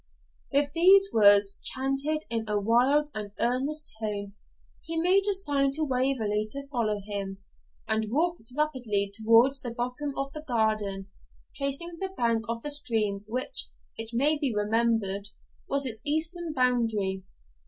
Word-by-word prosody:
With 285 0 +1
these 390 +4 +6
words, 205 -2 +5
chanted 275 +4 -1
in 225 -1 -3
a 210 0 +1
wild 255 +8 +2
and 210 -2 -6
earnest 275 +6 0
tone, 205 -2 -4 0.5
he 330 0 -4
made 375 +4 +3
a 400 - +2
sign 285 -7 +2
to 310 +2 +2
Waverley 250 -6 -1
to 280 +3 -5
follow 220 -6 -1
him, 200 -2 -4 0.5
and 220 -1 0
walked 315 -4 -1
rapidly 240 -10 -1
towards 230 +5 +4
the 245 - -5
bottom 250 +5 -3
of 275 +1 -3
the 305 - -7
garden, 215 -5 -1 0.4
tracing 285 +5 -1
the 385 - -3
bank 230 -1 0
of 230 0 -4
the 295 - -1
stream 220 -8 +1
which, 250 +4 -1 0.3
it 225 0 -3
may 290 +6 +2
be 280 -4 0
remembered, 210 -2 0 0.4
was 280 0 +2
its 220 -4 0
eastern 325 +3 +1
boundary. 225 -8 0
245 Hz, 145 wpm, -27 LUFS, 215-290 Hz, 0.5 s, these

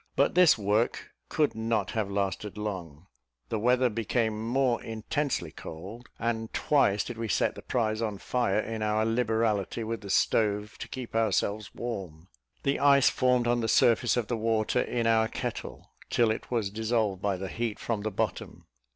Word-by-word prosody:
But - - +3
this 180 -6 +6
work 105 +3 0 0.2
could 150 -2 +1
not 110 -3 -1
have 110 -3 -1
lasted 100 +1 -2
long; 90 -7 -5 0.4
the 110 - -1
weather 125 +3 +3
became 110 -1 -1
more 130 -1 +2
intensely 115 - -2
cold, 100 - -9
and 115 -1 -2
twice 105 -9 +3
did 120 -2 -7
we 115 - -2
set 100 - +1
the - - -10
prize 110 -2 -1
on 105 -3 -2
fire, 110 -1 0
in 110 0 -3
our 110 0 +1
liberality 115 -2 0
with 115 0 -4
the 100 - -9
stove 105 +1 +1
to - - -6
keep 125 -3 -7
ourselves 105 -1 0
warm. 95 -8 -6 0.3
The 140 - +1
ice 140 -1 +5
formed 125 -1 +2
on 120 0 +2
the 115 - -1
surface 120 +1 +4
of 120 - 0
the 120 +1 -2
water 110 +2 +1
in 120 -1 -1
our 110 -1 +4
kettle, - - -6 0.2
till 115 -2 +3
it 110 - -5
was 115 -5 -1
dissolved 110 -3 0
by 100 -2 0
the 95 +1 -5
heat 115 +1 -3
from 110 -3 -2
the 110 - -2
bottom. 100 - -3
110 Hz, 175 wpm, -28 LUFS, 105-120 Hz, 0.4 s, this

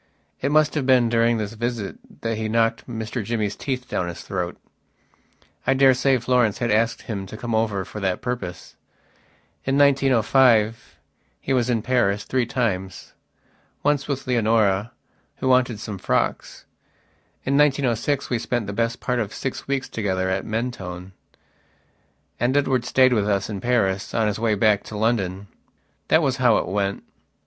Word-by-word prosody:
It 140 - 0
must 155 0 +3
have 145 -4 -1
been 125 -3 +4
during 115 0 +2
this 105 0 -4
visit 115 -2 -3 0.3
that 115 -1 -1
he 110 0 -3
knocked 115 +2 0
Mr 110 0 -4
Jimmy's 105 -2 -2
teeth 130 -2 -4
down 90 - -2
his 85 - -6
throat. 90 -2 -4 1.1
I 135 - +4
daresay 135 0 +4
Florence 120 -3 +1
had 120 -2 -1
asked 115 +2 +1
him 100 -5 -5
to 110 - -9
come 120 +1 -4
over 110 -4 0
for 105 - -8
that 95 -2 -1
purpose. 120 -8 -5 0.9
In 135 +1 0
1905 125 -5 +3 0.4
he 135 - -2
was 125 -2 +1
in 115 -3 0
Paris 105 -6 +1
three 130 -2 -1
timesonce 120 +6 -4
with 140 -2 -3
Leonora, 110 -4 +2 0.4
who - - -3
wanted 125 -4 +3
some 105 -2 -6
frocks. - - -2 0.8
In 135 - +1
1906 140 -1 +1
we 120 - +1
spent 120 -1 -2
the 100 - -5
best 115 +3 -1
part 125 -1 -1
of 110 -3 -2
six 130 - -5
weeks 135 -1 -1
together 95 -3 -1
at 95 +1 -2
Mentone, 95 -6 -4 1.3
and 125 +4 +2
Edward 130 -4 +1
stayed 130 -1 +4
with 105 -3 +1
us 100 +1 0
in 100 -2 -5
Paris 100 -6 0
on 115 - +2
his 105 0 -1
way 110 -2 +1
back 105 0 +3
to 105 - -7
London. 100 -4 0 0.6
That 160 +1 +4
was 135 -2 +1
how 125 -4 +4
it - - -1
went. 100 +1 -2
115 Hz, 160 wpm, -23 LUFS, 105-130 Hz, 1.3 s, been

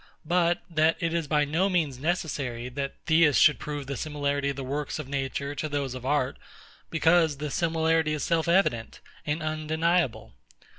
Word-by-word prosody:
but 175 +1 +1
that 160 -1 +2
it 165 -2 -1
is 165 -3 -1
by 150 0 +2
no 165 +7 +1
means 155 -8 0
necessary, 135 -7 -2
that 140 +1 -4
Theists 160 -3 +4
should 150 - +5
prove 145 -2 -5
the 140 +1 -4
similarity 145 0 -1
of 140 - -3
the 135 - -5
works 140 +2 -3
of 155 -4 -6
Nature 140 +1 -3
to 155 +1 -4
those 140 -3 -2
of 130 0 -6
Art; 140 -2 0 0.5
because 165 -2 +3
this 150 0 -4
similarity 160 -1 +1
is 150 - -4
self 165 -1 +1
evident 170 - +1 0.3
and 150 +2 -1
undeniable? 155 0 0
150 Hz, 170 wpm, -27 LUFS, 140-165 Hz, 0.5 s, should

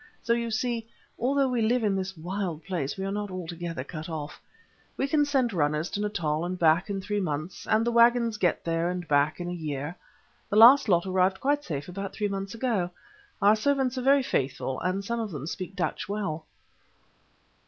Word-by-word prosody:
So 235 - +2
you 235 0 -1
see, 230 0 -2 0.3
although 275 +3 +2
we 250 -2 0
live 235 +2 +2
in 205 -2 +2
this 190 -1 -3
wild 175 -1 -4
place, 170 -5 -3
we 190 - -3
are 195 - -2
not 205 0 -3
altogether 170 -4 -5
cut 155 +3 -7
off. 150 -2 -6 0.6
We 270 - 0
can 295 0 +3
send 265 -6 +1
runners 150 0 0
to 205 - -2
Natal 170 -7 -1
and 180 +1 -3
back 170 +4 +3
in 200 -1 -2
three 205 +2 -2
months, 155 -1 -4
and 220 +1 +3
the 235 - +1
waggons 235 -1 +4
get 175 -4 0
there 165 +1 0
and 180 -1 -4
back 145 +2 +2
in 175 - -4
a - - -3
year. 150 -1 -4 0.5
The - - -1
last 235 +3 +8
lot 175 -1 +3
arrived 190 0 +2
quite 290 +2 +1
safe 145 - -4
about 195 +2 -5
three 210 - -1
months 195 +2 -4
ago. 225 -7 0 0.5
Our 205 +2 +7
servants 265 +2 +1
are 255 - -2
very 275 +1 +4
faithful, 135 - -1
and 185 +2 -2
some 235 +2 -2
of 225 -2 -2
them 145 -6 -6
speak 185 +2 -5
Dutch 175 +1 -2
well." 165 -7 -3
195 Hz, 200 wpm, -27 LUFS, 165-230 Hz, 0.6 s, last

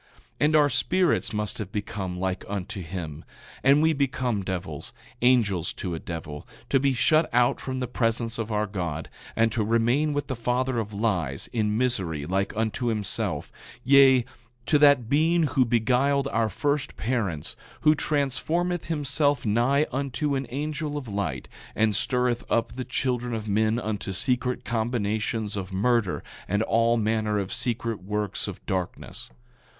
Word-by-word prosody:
9:9 - - -27
And 150 +1 +3
our 145 -1 +5
spirits 180 +8 +2
must 105 0 -2
have 100 -3 -5
become 95 -3 -4
like 95 0 -2
unto 100 -1 -4
him, 80 -3 -6 0.4
and 140 +3 +5
we 160 0 +4
become 130 -6 0
devils, 90 -6 -5 0.3
angels 110 -9 +3
to 90 -3 -4
a 80 - -3
devil, 80 -3 -7 0.2
to 135 - +4
be 140 +1 +2
shut 155 +5 +3
out 120 0 +3
from 130 -1 -3
the 125 - -1
presence 115 -1 -1
of 115 0 -3
our 105 0 +1
God, 85 -6 -4 0.2
and 115 0 +3
to 110 0 0
remain 120 +7 +2
with 145 0 -1
the 130 - -3
father 125 +1 0
of 105 -1 -4
lies, 95 - -1
in 105 -2 +1
misery, 95 - 0
like 95 +4 0
unto 110 +2 -1
himself; 105 -4 -2 0.3
yea, 135 -2 +6 0.4
to 150 - +3
that 140 -5 +5
being 160 +5 +3
who 140 -3 +3
beguiled 130 +4 +2
our 115 -3 +1
first 145 +8 -1
parents, 105 - -2 0.3
who 155 0 +6
transformeth 155 +4 0
himself 145 -3 0
nigh 120 +7 +3
unto 140 +2 -1
an 135 -2 -2
angel 150 +2 -3
of 135 -4 -6
light, 95 - -3 0.3
and 110 -1 +2
stirreth 125 +1 0
up 115 - +1
the 130 - -5
children 125 -2 -1
of 110 -1 -5
men 110 +2 +2
unto 105 -3 -3
secret 125 +5 -1
combinations 110 -2 -1
of 95 -1 -5
murder 105 0 +1 0.2
and 105 +3 +1
all 115 +1 +3
manner 110 -1 0
of 100 -2 -2
secret 115 -3 -2
works 105 +1 -2
of - - -8
darkness. 90 -2 -4
115 Hz, 160 wpm, -26 LUFS, 105-135 Hz, 0.4 s, yea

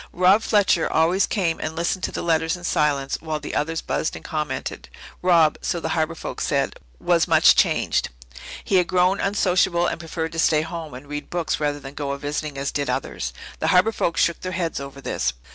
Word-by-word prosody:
Rob 185 +4 +5
Fletcher 205 -6 +2
always 170 +5 +3
came 175 -6 0
and 160 - -4
listened 170 +2 -1
to - - -4
the - - -4
letters 165 0 +1
in 180 - -13
silence 145 -5 0
while 155 -1 -3
the 150 - -7
others 160 +2 -1
buzzed 160 - -2
and - - -10
commented. 155 -2 -4 0.3
Rob, 170 -4 +4
so 175 - -1
the 160 - -3
Harbour 160 0 0
folk - - -6
said, - - 0 0.2
was - - +2
much - - +6
changed. - - +2 0.5
He 195 - +2
had 180 -1 +3
grown 185 +2 +2
unsociable 185 -3 +2
and - - -2
preferred 160 0 -4
to 165 - -5
stay 155 -1 +3
home 160 -4 -6
and 130 +3 -10
read 145 0 -6
books 175 -2 -1
rather 145 -1 -1
than 135 0 -9
go 140 -1 -3
a - - -4
visiting 145 0 -4
as 140 0 -2
did 145 -1 -2
others. 65 0 -3 0.3
The - - -1
Harbour 185 +5 +4
folk 170 -5 -1
shook 170 - +2
their 185 0 -4
heads 170 -4 -2
over 140 0 -8
this. 65 - -1
165 Hz, 210 wpm, -23 LUFS, 150-180 Hz, 0.5 s, much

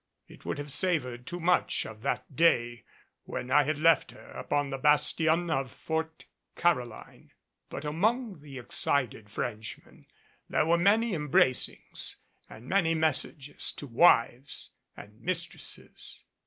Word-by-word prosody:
It - - -16
would - - -2
have 145 0 -5
savored 135 -7 -1
too 175 - -4
much 180 +1 +2
of 110 -1 -9
that 135 - -3
day 120 -7 +2 0.4
when 125 +1 -5
I 150 - +7
had 155 +1 0
left 160 -1 +4
her - - -14
upon 145 -1 -2
the 135 - -3
bastion 160 +4 +3
at 135 -3 0
Fort 160 +3 -4 0.3
Caroline. 125 -10 -2 0.4
But 140 - -6
among 210 +6 0
the 140 -2 -10
excited 120 -3 -1
Frenchmen 110 0 -6 0.4
there - - +2
were 170 +1 +3
many 215 +6 +3
embracings 150 -5 0 0.3
and 110 - -12
many 165 -1 +2
messages 155 -2 -1
to - - -8
wives 130 -1 +3 0.3
and 105 +2 -13
mistresses. 175 -1 -5
150 Hz, 130 wpm, -29 LUFS, 125-170 Hz, 0.4 s, I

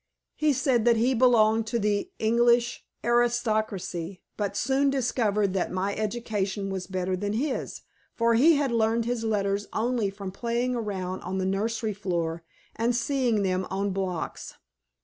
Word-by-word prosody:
He 305 -1 +2
said 260 -3 +2
that 235 -1 +5
he 245 +4 +2
belonged 225 -3 +4
to 235 - 0
the 210 - 0
English 235 +2 +2 0.2
aristocracy, 215 -7 0
but 200 -1 -2
soon 270 +2 +2
discovered 220 -7 +1
that 190 - -1
my 190 +2 -1
education 205 -3 -2
was 190 -1 -4
better 185 0 -1
than 205 +2 -2
his, 260 +5 -3 0.3
for 230 0 +2
he 300 +8 +6
had 280 -3 0
learned 230 0 +1
his 240 -1 -2
letters 205 -2 0
only 230 -2 0
from 195 -1 -7
playing 235 +4 -1
around 190 -5 -3
on 185 +2 -4
the 190 - -1
nursery 215 +3 -1
floor 170 -4 -2 0.3
and 235 +2 +1
seeing 240 -3 +1
them 185 -1 0
on 200 +1 -1
blocks. 185 -3 -4
220 Hz, 150 wpm, -27 LUFS, 195-240 Hz, 0.3 s, he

